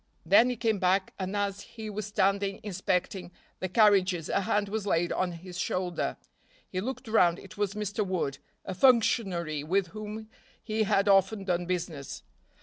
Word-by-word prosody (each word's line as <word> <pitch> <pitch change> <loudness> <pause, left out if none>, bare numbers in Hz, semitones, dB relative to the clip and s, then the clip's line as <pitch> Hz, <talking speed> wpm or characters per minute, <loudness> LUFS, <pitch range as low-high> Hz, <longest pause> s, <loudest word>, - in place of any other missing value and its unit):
Then 205 +8 +6
he 250 - -1
came 220 -3 0
back 185 +1 +1
and 190 +1 -3
as 200 0 -1
he 220 0 -9
was 210 -1 -4
standing 195 -1 +1
inspecting 185 -2 -2 0.3
the 185 - -3
carriages 190 -5 +3
a - - +1
hand 205 +2 0
was 205 0 -3
laid 175 -2 +1
on 185 -1 0
his 175 +1 -8
shoulder. 180 -1 -2 0.5
He 185 - -3
looked 260 +2 -5
round, 180 -6 +4
it 200 +2 -12
was 205 -1 -1
Mr. 210 0 -2
Wood, 175 -8 -2 0.3
a - - -4
functionary 185 - +2
with 180 +3 0
whom 215 +2 -7 0.4
he 220 -1 0
had 200 +1 +3
often 195 +1 +4
done 175 -2 -1
business. 170 -6 -4
195 Hz, 165 wpm, -29 LUFS, 180-210 Hz, 0.5 s, Then